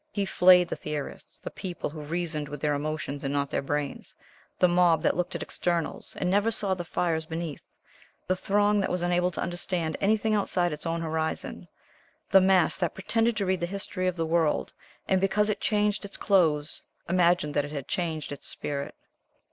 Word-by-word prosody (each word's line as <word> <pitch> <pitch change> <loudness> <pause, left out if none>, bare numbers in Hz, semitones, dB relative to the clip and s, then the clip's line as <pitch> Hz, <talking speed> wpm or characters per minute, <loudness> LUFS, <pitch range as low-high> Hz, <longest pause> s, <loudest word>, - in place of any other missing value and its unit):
He 200 -1 -1
flayed 180 -1 +6
the - - -3
theorists, 150 -2 -6
the - - -8
people 180 -3 -5
who 155 0 -7
reasoned 155 -1 -3
with 145 - -6
their 150 0 +1
emotions 145 -1 -3
and 135 - -1
not 140 -1 -1
their - - 0
brains, 145 0 -2 0.4
the 180 - +5
mob 175 -3 +4
that - - +2
looked 180 +1 -2
at - - -3
externals, 170 -2 -2
and 180 - 0
never 205 +4 +3
saw 205 -3 +1
the 180 -2 -4
fires 160 -1 -1
beneath, 160 -3 -5 0.6
the 185 - +1
throng 205 +2 +2
that 195 - 0
was 180 -1 -1
unable 175 0 +2
to 180 - -5
understand 175 -2 -2
anything 215 +2 +2
outside 180 -5 +1
its 150 +2 -4
own 165 0 -1
horizon, 160 -1 -3 0.6
the 195 - +8
mass 185 -2 +4
that 175 -3 -1
pretended 225 +4 +1
to 200 - 0
read 185 -1 +1
the 175 - -1
history 190 -1 -3
of 180 - 0
the 165 -2 -1
world, 160 -1 +1 0.3
and 190 -1 +2
because 210 +2 +2
it 210 - -1
changed 210 -1 +1
its 200 -1 -7
clothes 160 -7 +2 0.2
imagined 175 -3 +2
that 145 - +1
it - - -7
had 140 -3 -5
changed 160 -5 -2
its 145 - -7
spirit. 140 -1 -4
175 Hz, 195 wpm, -27 LUFS, 155-190 Hz, 0.6 s, the